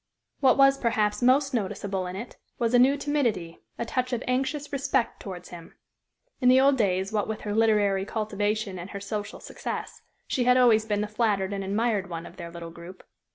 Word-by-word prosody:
What 260 -3 +4
was, 275 0 +5
perhaps, 215 -3 0
most 270 +3 +3
noticeable 195 -3 -2
in 180 - -6
it 230 +5 -7 0.2
was 235 -1 0
a 245 - +6
new 270 +3 +5
timidity, 245 - -1 0.2
a 235 - -3
touch 255 +2 -2
of 240 - -1
anxious 270 +3 -1
respect 270 -3 0
towards 185 -3 -8
him. 170 -2 -11 0.6
In 250 - +4
the 255 +1 +7
old 275 +1 +5
days, 195 -4 0
what 210 -1 0
with 220 0 -4
her 205 - -3
literary 210 -3 +3
cultivation 210 -2 -2
and 180 +3 -7
her 200 - -6
social 205 +1 -5
success, - - -6 0.3
she 250 - 0
had 250 0 +5
always 230 -4 +5
been 210 -2 0
the 210 - -2
flattered 210 -3 0
and 195 -1 -3
admired 205 -1 0
one 165 -1 -5
of - - -12
their 170 -1 -7
little 170 0 -8
group. 170 +2 -12
215 Hz, 200 wpm, -26 LUFS, 195-250 Hz, 0.6 s, the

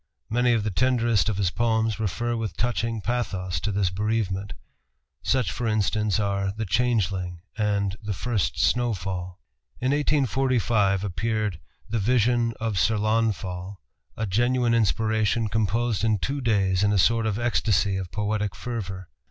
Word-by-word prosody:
Many 120 +1 +3
of 110 -3 +1
the 105 - -1
tenderest 120 -1 +2
of 105 - -2
his 95 -3 +1
poems 110 -1 +1
refer 110 +3 -1
with 115 -5 -4
touching 115 -2 -1
pathos 95 -7 -2
to 105 - -2
his 100 -2 +1
bereavement: 100 -1 -1 0.7
such 130 0 +1
for 120 - -3
instance 105 -1 +1
are 100 -1 0
"The 110 - -2
Changeling" 95 -5 0
and 100 -3 0
"The 105 -3 -3
First 105 - -1
Snowfall." 95 -6 -1 0.4
In 130 +2 +1
1845 130 -8 +2
appeared 105 -2 -1 0.3
"The 115 +1 -1
Vision 120 +1 +2
of 110 -4 -1
Sir 110 +3 +2
Launfal," 100 -3 -1 0.4
a 110 - -1
genuine 120 +4 +2
inspiration 110 0 +1
composed 110 +1 0
in 110 -2 +3
two 140 +8 -2
days 100 -6 +2
in 105 - +3
a 105 - +2
sort 115 +4 +3
of 105 -2 -1
ecstasy 105 -3 +1
of 95 -2 -4
poetic 105 -1 -1
fervor. 100 -7 -5
110 Hz, 145 wpm, -25 LUFS, 100-115 Hz, 0.7 s, Many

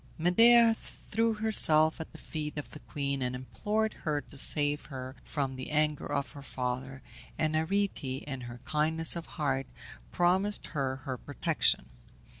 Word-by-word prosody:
Medea 230 +7 +6
threw 225 0 -2
herself 160 -8 +5
at 160 - -9
the - - -12
feet 150 -1 -4
of 150 - -6
the 150 - -10
queen, 140 -2 -4
and 125 0 -2
implored 210 +12 -2
her 150 -2 -2
to - - -17
save 145 0 +3
her 130 -1 -7
from 135 -3 -3
the 130 0 -7
anger 150 -1 0
of 140 -1 -2
her 140 - -11
father, 130 0 -5 0.3
and 155 0 0
Arete, 160 -6 -1
in 135 -3 -6
her 120 0 -9
kindness 160 +2 +2
of 170 -1 -6
heart, 135 -3 -1 0.4
promised 190 +4 +1
her 135 -3 -1
her 130 -3 -4
protection. - - 0
150 Hz, 155 wpm, -30 LUFS, 135-175 Hz, 0.4 s, Medea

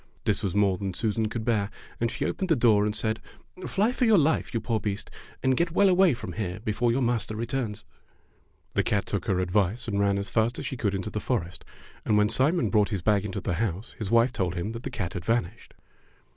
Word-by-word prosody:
This - - +1
was 95 -2 -2
more 100 -3 +2
than 95 -2 -3
Susan 110 -1 0
could 110 0 -4
bear, 105 -4 +1 0.3
and 115 - +1
she - - -3
opened 190 - -2
the 160 - +5
door 110 -5 +4
and 105 - -2
said, 110 0 -1 0.4
''Fly 205 +5 0
for 250 - +1
your 220 -3 +6
life, 160 0 +2
you 115 - -1
poor 115 -1 -1
beast, 100 -2 -4 0.3
and 130 0 +3
get 170 +3 0
well 200 +1 +5
away 180 -5 +5
from - - -7
here 95 -3 -4
before 115 +3 +1
your 130 +3 +1
master 120 -2 -1
returns." 115 -2 -3 0.9
The - - +3
cat 100 -1 0
took 100 -4 -3
her 95 -2 +1
advice 100 +5 0
and 100 -3 -1
ran 100 0 +2
as 100 0 -4
fast 110 +2 +1
as - - -5
she - - -2
could 105 -5 -1
into 95 +2 -4
the 105 - -2
forest, 90 -8 -3 0.4
and 105 - +2
when 105 0 +4
Simon 140 +9 +2
brought 105 -2 +3
his 100 -6 -3
bag 105 0 +2
into 95 - -4
the 95 - -2
house 100 -1 -3
his 105 -3 -3
wife 115 +2 +4
told 90 -7 -1
him 85 +5 -3
that 115 0 -6
the - - -4
cat 90 -7 -4
had 90 - -5
vanished. 110 -1 -2
110 Hz, 235 wpm, -27 LUFS, 100-120 Hz, 0.9 s, your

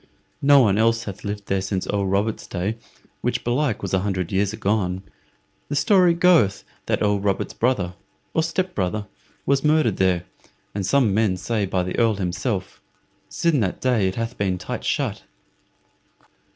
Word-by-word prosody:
No 140 0 +7
one 105 -3 +3
else 115 +1 +3
hath 100 -2 -8
lived 100 0 -4
there 95 -1 0
since 95 -1 -2
Earl 100 -1 0
Robert's 100 +3 -1
day, 100 +5 -3 0.4
which - - -1
belike 125 -1 0
was 95 - -3
an 95 - +3
hundred 95 -3 -2
years 100 0 +1
agone. 100 -4 -1 0.7
The 145 - -2
story 180 +1 +4
goeth 170 - +4 0.2
that - - +1
Earl 105 -1 +2
Robert's 100 -1 -1
brother 105 -8 0 0.4
or 160 - +2
step 180 +3 -1
brother 105 +3 -1 0.4
was 140 0 +2
murdered 150 -8 +3
there, 90 -2 +2 0.5
and 100 -2 -2
some 125 -4 +3
men 105 -3 +2
say 105 0 -1
by 90 -1 0
the 90 - -3
Earl 115 -2 +3
himself. 95 +1 -3 0.5
Sin 165 -4 +1
that 95 -5 -1
day 120 -7 +2
it 95 - -2
hath 115 +1 -4
been 95 -2 0
tight 90 - -5
shut." - - -1
105 Hz, 165 wpm, -23 LUFS, 95-125 Hz, 0.7 s, No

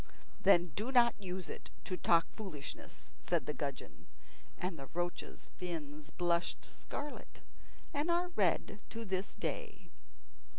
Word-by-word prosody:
"Then 175 -3 +6
do 225 +6 -1
not 240 -2 +7
use 185 -1 -3
it - - -7
to 185 - -1
talk 170 -2 +5
foolishness," 175 -10 -6
said - - +1
the - - -1
gudgeon; - - -4 0.5
and 180 0 -1
the 135 - -7
roach's 175 0 -2
fins 155 -4 -4
blushed 170 0 +1
scarlet, 290 0 -6 0.5
and 290 +4 +1
are 350 +1 +3
red 200 - +2
to 230 0 -4
this 190 0 -1
day. - - -4
185 Hz, 130 wpm, -36 LUFS, 170-225 Hz, 0.5 s, not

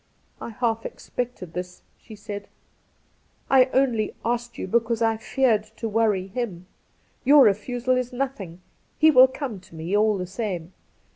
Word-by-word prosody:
' - - -37
I - - -5
half 225 -1 -1
expected 240 -9 -6
this,' 180 0 -7 0.2
she 220 - -12
said. 205 0 -7 0.5
' - - -40
I 265 -1 +7
only 250 -5 0
asked 240 0 -2
you - - -4
because 230 +3 0
I 225 -1 +2
feared 230 -1 +1 0.2
to 230 - -3
worry 210 -3 +1
him. 195 -4 -5 0.6
Your 285 +1 +7
refusal 245 +4 +1
is 255 0 -2
nothing. 245 -10 -5 0.4
He 315 0 +6
wUl 255 -2 +8
come 260 -5 -6
to 180 -2 -17
me 165 +5 -3
all 210 0 +3
the 180 - -3
same. 185 -3 -5
225 Hz, 160 wpm, -24 LUFS, 195-250 Hz, 0.6 s, wUl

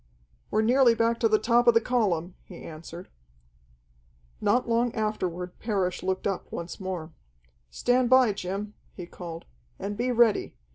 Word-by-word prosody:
"We're 215 - +1
nearly 245 +1 +5
back 230 +1 +1
to 225 - +3
the 215 - +4
top 235 +2 +2
of 235 - +6
the - - +7
column," 195 -8 0
he - - -12
answered. 165 +3 -9 1.3
Not 245 +1 +2
long 235 +1 +1
afterward 185 -5 -3
Parrish 195 -5 -1
looked 185 0 -2
up 195 -3 -3
once 170 +1 -6
more. 180 -4 -5 0.6
"Stand 245 - +1
by, 255 -4 +5
Jim!" 195 +3 -5 0.2
he 180 - -7
called. 170 -1 -9 0.3
"And 205 +1 -4
be 245 +4 -1
ready. 235 -3 +2
210 Hz, 150 wpm, -27 LUFS, 180-235 Hz, 1.3 s, the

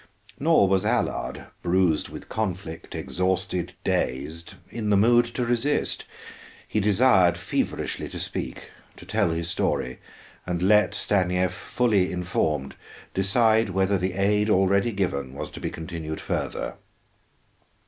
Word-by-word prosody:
Nor 155 -8 +4
was 95 0 +2
Allard, 105 - -1 0.2
bruised 90 -3 +2
with - - -9
conflict, 90 -6 -4
exhausted, 90 -1 -1
dazed, 75 +6 -2 0.2
in 110 -3 -3
the 100 - +4
mood 120 +3 +5
to 120 +1 -3
resist. 120 +5 0 0.6
He 110 - 0
desired 100 -4 +4
feverishly 85 - -2
to - - -7
speak; - - -5 0.3
to - - -12
tell 105 0 +1
his 85 +1 -2
story 65 -6 -1 0.5
and 90 -1 -1
let 105 -1 +4
Stanief, 90 -2 +1
fully 100 -1 +1
informed, 80 -6 -1 0.4
decide 110 +3 +3
whether 95 +1 +1
the 90 +1 -1
aid 105 +2 +2
already 100 +3 +3
given 70 - -2
was - - -5
to - - -8
be - - -3
continued 80 -2 -6
further. - - -3
95 Hz, 130 wpm, -25 LUFS, 85-105 Hz, 0.6 s, mood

